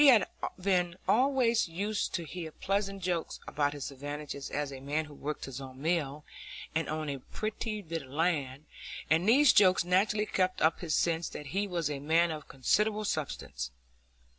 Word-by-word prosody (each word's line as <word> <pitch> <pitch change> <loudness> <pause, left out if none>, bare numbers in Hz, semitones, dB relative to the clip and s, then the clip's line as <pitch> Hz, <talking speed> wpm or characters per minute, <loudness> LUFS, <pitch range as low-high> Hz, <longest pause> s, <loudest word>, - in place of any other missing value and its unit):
He 295 - +8
had 230 -8 +7 0.3
been 180 -2 +1
always 250 -3 +3
used 200 +6 -2
to 170 - -2
hear 165 +1 -6
pleasant 195 +2 -2
jokes 175 -2 -1
about 145 0 0
his 145 -1 -5
advantages 145 0 -6
as 145 -1 -2
a 135 - -7
man 145 +4 -1
who 150 - -12
worked 150 +1 -4
his 135 0 -6
own 130 -1 -9
mill, 150 -2 -1 0.5
and 160 0 0
owned 155 -1 -2
a 140 - -4
pretty 215 - -4
bit 165 -1 -4
of 130 - -13
land; 145 -2 0 0.5
and 165 +6 +4
these 280 +4 +7
jokes 185 -3 +6
naturally 205 +4 +2
kept 185 -2 0
up 160 +1 +3
his 160 -3 -1
sense 165 0 +1
that 150 - -7
he 200 +2 +1
was 170 -5 -1
a 145 -2 -3
man 165 +4 +3
of 155 -2 -6
considerable 210 - +1
substance. 130 - -3
165 Hz, 180 wpm, -31 LUFS, 145-195 Hz, 0.5 s, He